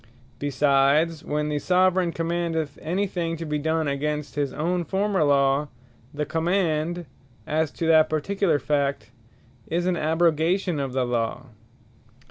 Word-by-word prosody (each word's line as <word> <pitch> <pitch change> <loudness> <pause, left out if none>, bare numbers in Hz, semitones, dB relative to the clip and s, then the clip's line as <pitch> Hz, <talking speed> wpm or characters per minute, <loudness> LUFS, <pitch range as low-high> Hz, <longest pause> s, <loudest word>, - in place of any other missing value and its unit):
Besides, 145 +3 +2
when 150 0 -2
the 150 -1 -1
Soveraign 185 +1 +2
commandeth 165 -3 -2
any 180 +6 -1
thing 170 -3 -3
to 165 - -5
be 150 -1 -2
done 160 +1 0
against 150 +1 -2
his 145 -2 -1
own 175 +3 -1
former 190 +1 0
Law, 140 0 +3 0.4
the 150 +1 -3
Command, 165 +1 0 0.4
as 155 0 0
to 165 - -3
that 160 -1 +5
particular 165 +2 +1
fact, 140 -3 -1 0.6
is 175 +2 -1
an 180 -1 +1
abrogation 165 +2 +1
of 135 -2 -3
the 130 -1 +1
Law. 120 +2 -2
155 Hz, 135 wpm, -24 LUFS, 145-175 Hz, 0.6 s, that